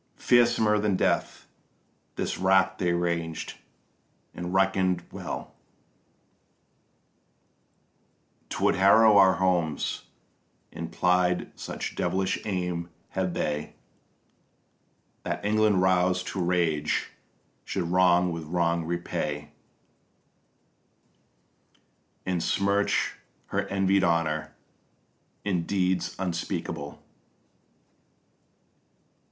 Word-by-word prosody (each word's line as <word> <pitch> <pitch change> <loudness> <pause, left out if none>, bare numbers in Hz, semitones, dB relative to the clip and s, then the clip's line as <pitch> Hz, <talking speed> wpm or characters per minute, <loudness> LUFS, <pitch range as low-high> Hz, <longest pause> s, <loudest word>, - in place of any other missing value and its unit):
Fearsomer 120 -3 +3
than 105 -2 +1
death - - 0 0.7
this - - -3
rack 95 0 +3
they 90 -2 +1
ranged, 85 -2 -2 0.7
and 90 0 -5
reckon'd 95 -1 +2
well - - -6 3.0
'Twould - - +1
harrow 105 +2 +6
our 95 -1 +6
homes, 90 -5 0 0.7
and 85 0 -6
plied, 90 0 +1
such - - -6
devilish 95 +2 -1
aim 90 -4 -2 0.2
had 95 -2 -2
they, 75 0 -2 1.5
That - - -4
England 105 -2 +3
roused 90 0 +2
to 95 - -2
rage 85 -4 0 0.5
should 95 - -2
wrong 90 -1 +4
with 85 -1 -5
wrong 85 0 0
repay, 75 -3 -3 2.7
And 90 -2 -1
smirch 100 +3 +1 0.3
her - - -1
envied 95 0 +2
honour 80 -2 0 0.9
in 90 -5 -1
deeds 95 -2 0
unspeakable. 85 -5 -4
90 Hz, 80 wpm, -27 LUFS, 85-95 Hz, 3.0 s, harrow